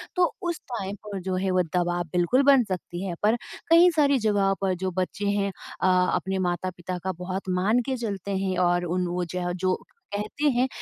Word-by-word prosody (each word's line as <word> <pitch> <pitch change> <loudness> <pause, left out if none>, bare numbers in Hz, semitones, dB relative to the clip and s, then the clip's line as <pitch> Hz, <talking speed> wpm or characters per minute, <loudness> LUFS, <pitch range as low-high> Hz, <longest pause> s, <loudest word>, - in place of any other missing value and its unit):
तो 360 -1 +2 0.2
उस 340 - -3
टाइम 200 -4 -3
पर 200 -2 -4
जो 185 0 -2
है 190 +1 0
वो 185 0 +3
दवाब 175 -1 0
बिल्कुल 180 +10 +3
बन 275 -2 +6
सकती 185 0 -4
है। 175 -2 -3
पर 215 +2 +4 0.3
कई 335 +2 +8
सारी 285 -3 +4
जगहों 205 -3 +2
पर 190 -1 +1
जो 185 - 0
बच्चे 195 +2 -2
हैं 200 -1 0 0.3
अ, - - +3 0.3
अपने 190 0 -1
माता-पिता 180 +1 -4
का 190 - 0
बहुत 185 +1 -4
मान 215 +6 +3
के 265 -1 -1
चलते 200 -4 -3
हैं 190 -1 -1
और 175 0 +2
उन 180 +1 -1
वो 175 0 -2
जह 180 -1 -1
जो 185 0 0 0.4
कहते 215 +8 -3
हैं 255 +2 +3
190 Hz, 200 wpm, -26 LUFS, 180-215 Hz, 0.4 s, कई